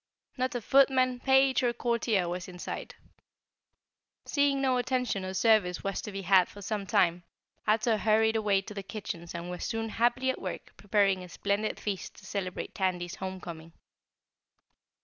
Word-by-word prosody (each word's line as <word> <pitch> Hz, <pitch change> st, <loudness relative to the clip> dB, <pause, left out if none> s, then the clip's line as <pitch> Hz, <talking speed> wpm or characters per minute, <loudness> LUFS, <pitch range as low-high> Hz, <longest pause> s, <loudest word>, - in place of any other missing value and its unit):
Not 255 Hz, 0 st, -1 dB
a 245 Hz, -, -1 dB
footman, 260 Hz, 0 st, +4 dB
page 265 Hz, +1 st, +4 dB
or 240 Hz, -2 st, +1 dB
courtier 235 Hz, -6 st, 0 dB
was 175 Hz, 0 st, -4 dB
in 180 Hz, -1 st, -10 dB
sight. -, -, -6 dB, 1.3 s
Seeing 285 Hz, -1 st, +2 dB
no 260 Hz, -2 st, +2 dB
attention 250 Hz, -5 st, -1 dB
or 185 Hz, 0 st, -4 dB
service 195 Hz, -3 st, +3 dB
was 195 Hz, 0 st, -2 dB
to 210 Hz, -, -6 dB
be 195 Hz, 0 st, -5 dB
had 185 Hz, -1 st, +5 dB
for 205 Hz, -, -12 dB
some 200 Hz, 0 st, -3 dB
time, 180 Hz, -5 st, +3 dB, 0.5 s
Ato 220 Hz, +1 st, +3 dB
hurried 220 Hz, +1 st, +3 dB
away 205 Hz, -3 st, +2 dB
to 210 Hz, -, -9 dB
the 200 Hz, -, -5 dB
kitchens 195 Hz, -4 st, -6 dB
and 170 Hz, +1 st, -5 dB
was 180 Hz, -, -5 dB
soon 225 Hz, 0 st, -2 dB
happily 240 Hz, +4 st, +2 dB
at -, -, -8 dB
work -, -, -6 dB
preparing 200 Hz, -2 st, +1 dB
a 180 Hz, -, -10 dB
splendid 200 Hz, +4 st, -1 dB
feast 200 Hz, -3 st, -4 dB
to 190 Hz, -, -15 dB
celebrate 190 Hz, -2 st, -4 dB
Tandy's 180 Hz, -2 st, -1 dB
homecoming. 170 Hz, -4 st, -7 dB
210 Hz, 165 wpm, -29 LUFS, 185-240 Hz, 1.3 s, had